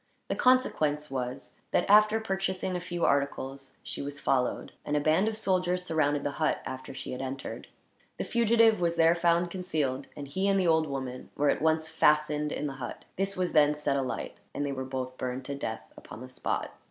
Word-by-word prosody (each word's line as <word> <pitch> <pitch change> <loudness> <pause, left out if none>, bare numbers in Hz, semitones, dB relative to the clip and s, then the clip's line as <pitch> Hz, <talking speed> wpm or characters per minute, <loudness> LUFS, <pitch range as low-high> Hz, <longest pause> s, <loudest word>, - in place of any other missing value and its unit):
The - - 0
consequence 155 - +2
was 130 0 -5
that, - - +1
after 215 +2 +6
purchasing 190 -3 -2
a - - -1
few 175 -1 -2
articles, 135 -1 -1
she - - -5
was 140 0 -5
followed; 125 -2 0
and 150 0 0
a - - +3
band 155 +7 +3
of 220 -1 -1
soldiers 180 -3 +1
surrounded 150 -3 +1
the 145 - -1
hut, 155 - +2
after 130 0 -6
she 130 - -6
had 125 - -4
entered. 135 0 -5 0.5
The - - -2
fugitive 230 -3 +4
was 170 -1 +1
there 165 0 +5
found 170 0 +2
concealed, 155 -8 -2
and 145 -1 -6
he 190 +8 -1
and 195 -1 +3
the 185 - +2
old 160 -2 +3
woman 130 -2 -5
were 145 0 +3
at - - -2
once 160 0 +2
fastened 150 -1 +2
in - - -3
the 140 - -3
hut. 120 - -6
This 195 +1 -2
was 180 -1 -1
then 150 -1 +5
set 150 -2 -1
alight, 135 -2 -3 0.2
and 145 - -1
they 140 - -2
were 130 -1 -4
burned 130 0 -4
to 140 - -4
death, 110 -5 -5
upon 115 - -11
the 130 - -8
spot. 130 - -3
150 Hz, 200 wpm, -29 LUFS, 135-180 Hz, 0.5 s, after